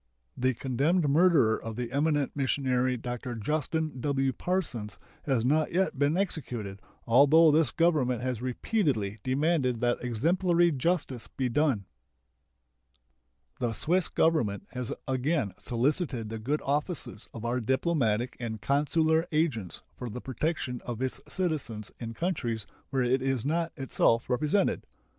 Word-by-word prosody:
The 130 0 +1
condemned 145 +7 +1
murderer 145 -7 +4
of 115 -1 -6
the 120 0 -4
eminent 145 0 +1
missionary 130 -2 +1
Dr. 120 +1 -5
Justin 150 +4 -2
W. 135 -1 +1
Parsons 135 - -2 0.3
has 125 -5 +1
not 155 +4 +2
yet 185 -6 +1
been 145 +4 +2
executed, 120 - -3 0.3
although 145 +7 +6
this 155 -2 +3
Government 150 -8 +2
has 125 -3 -2
repeatedly 125 - -1
demanded 130 -1 +1
that 120 0 +1
exemplary 170 - +2
justice 145 -4 -1
be 130 -2 -2
done. 130 -6 +1 1.7
The 120 -3 -1
Swiss 170 - +1
Government 120 -12 +1
has 125 -2 -4 0.2
again 130 - 0
solicited 125 - -1
the 110 0 -5
good 140 +8 -1
offices 145 - -2
of 115 0 -7
our 120 +2 0
diplomatic 125 -2 0
and 115 -3 -4
consular 160 - +2
agents 145 - -1
for 125 - -6
the 115 - -6
protection 130 -1 -3
of 120 +1 -4
its 130 - -2
citizens 145 - -2
in 115 -1 -6
countries 120 - -2 0.2
where 130 -2 +1
it 125 +2 +2
is 135 -3 -1
not 165 +3 0
itself 125 -3 +1
represented. 150 +10 +1
130 Hz, 135 wpm, -29 LUFS, 120-155 Hz, 1.7 s, although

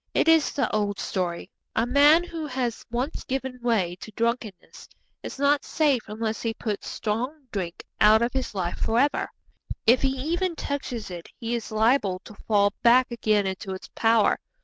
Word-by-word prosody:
It - - +3
is 325 -2 +5
the 280 - +1
old 205 -1 0
story. 180 0 -3 0.2
A 225 - +2
man 290 +6 +6
who 330 -3 -5
has 250 -4 -3
once 250 +6 -3
given 265 -1 -4
way 210 -8 +1
to 220 - -10
drunkenness 230 -4 -3 0.3
is - - -7
not 285 +1 +2
safe 290 -6 +1
unless 220 +1 -3
he 225 -1 -2
puts 210 -3 -4
strong 250 +7 -3
drink 180 -4 -4 0.2
out 215 +2 +6
of 235 - -1
his 260 -5 -3
life 175 -2 -2
for 225 - 0
ever. 285 +2 +1 0.6
If 240 +3 +5
he 270 - +3 0.2
even 355 -1 0
touches 255 -9 -4
it 175 -2 -8
he 230 -1 -3
is 235 -2 -4
liable 215 -3 +2
to - - -11
fall 205 -2 +3
back 250 +1 +5
again 215 -3 +1
into 190 0 -4
its 185 - -11
power. 225 -1 +3
230 Hz, 175 wpm, -25 LUFS, 210-270 Hz, 0.6 s, man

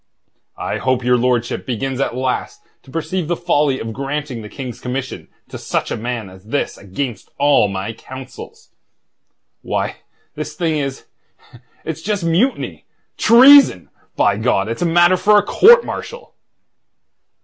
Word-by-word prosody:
I - - -3
hope 130 -1 0
your 125 +1 +3
lordship 120 -1 0
begins 130 +2 -3
at 130 - -1
last 130 0 -3 0.2
to - - -20
perceive 165 +3 -3
the 175 - 0
folly 150 -6 +1
of 115 0 -5
granting 140 -1 -4
the 105 - -9
King's 125 -2 -7
commission 130 +1 -5 0.2
to - - -8
such - - -3
a - - -1
man 120 -2 -4
as 95 +1 -15
this 140 +6 -2
against 105 +3 -6
all 140 -6 +4
my 100 +2 -4
counsels. 130 - -11 0.9
Why, - - -3 0.4
this - - -6
thing 165 -4 -1
is... 135 -2 -5 0.8
it's 160 0 -5
just 205 0 -2
mutiny... 175 +11 -1 0.3
treason! 255 - +6 0.2
By 100 - +2
God! 110 -3 0
It's 115 - -4
matter 175 +1 +4
for 210 +3 +4
a 205 - +4
court 475 +3 +6
martial." 485 -1 -7
135 Hz, 145 wpm, -18 LUFS, 120-175 Hz, 0.9 s, treason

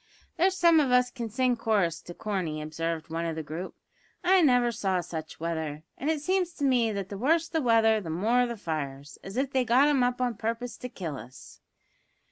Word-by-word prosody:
"There's 375 +2 +2
some 335 -3 +6
of 285 -4 +2
us 250 0 +4
can 235 -3 -5
sing 250 +3 +1
chorus 205 -8 0
to 175 - -10
Corney," 185 -7 -3
observed 160 +1 -4
one 165 +1 -2
of 165 - -3
the 160 - -4
group. 160 +5 -6 0.5
"I 370 +1 +5
never 245 -5 +4
saw 190 -4 0
such 160 -2 -6
weather; 160 -2 -3
and 290 - -3
it 315 -2 0
seems 365 0 0
to 295 - -6
me 245 -4 +3
that 200 -2 -4
the 200 - -6
worse 325 +7 +2
the 320 -1 -1
weather 225 -3 +4
the 170 - -7
more 225 +9 +2
the 235 -1 -5
fires, 145 -5 -5
as 195 +4 -7
if 270 +1 0
they 260 -2 +2
got 250 +4 +4
'em 280 -3 +3
up 245 0 +1
a 250 -1 0
purpose 230 +2 -3
to 250 - -7
kill 165 - -5
us." 120 +4 -13
225 Hz, 215 wpm, -28 LUFS, 165-255 Hz, 0.5 s, some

